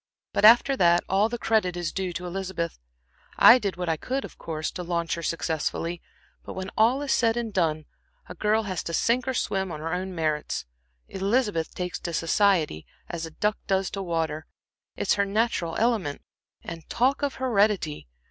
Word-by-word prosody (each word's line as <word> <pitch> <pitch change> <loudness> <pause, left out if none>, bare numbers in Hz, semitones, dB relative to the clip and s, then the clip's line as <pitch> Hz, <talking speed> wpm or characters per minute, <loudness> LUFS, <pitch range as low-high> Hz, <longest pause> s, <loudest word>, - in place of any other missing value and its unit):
But - - +3
after 240 +5 +7
that, 175 -1 +4
all 200 +3 +2
the 240 - -3
credit 215 -6 +1
is 175 -2 -2
due 190 -2 -3
to 180 +1 -5
Elizabeth. 180 - -4 0.6
I 245 +2 +9
did 200 -6 -3
what 180 -1 -3
I 160 -1 +1
could, 265 - -3
of - - -13
course, 155 -1 -4
to 180 - -6
launch 170 -1 -1
her 170 - -3
successfully, 165 +1 -2 0.4
but - - -7
when 190 +1 -5
all 245 +6 +3
is 280 - -2
said 230 -1 +2
and 230 -3 -3
done, 155 -4 0 0.4
a - - -8
girl 215 +1 +1
has 185 -4 -3
to 165 - -2
sink 245 +2 +1
or 260 - -1
swim 190 -5 -1
on 155 - -5
her 160 +2 -3
own 185 +1 -3
merits. 155 - -1 0.4
Elizabeth 195 -3 0
takes 180 -1 -3
to 170 - -5
society 165 - +1 0.2
as 165 -1 -4
a - - -9
duck 210 +6 -1
does 190 -1 +1
to 195 - -4
water; 160 -3 -2 0.5
it's - - +1
her 200 - +1
natural 200 -5 0
element. 215 -11 0 0.4
And 165 -1 -8
talk 260 +5 +1
of 285 -2 -1
heredity! 205 - +1
185 Hz, 185 wpm, -26 LUFS, 165-220 Hz, 0.6 s, I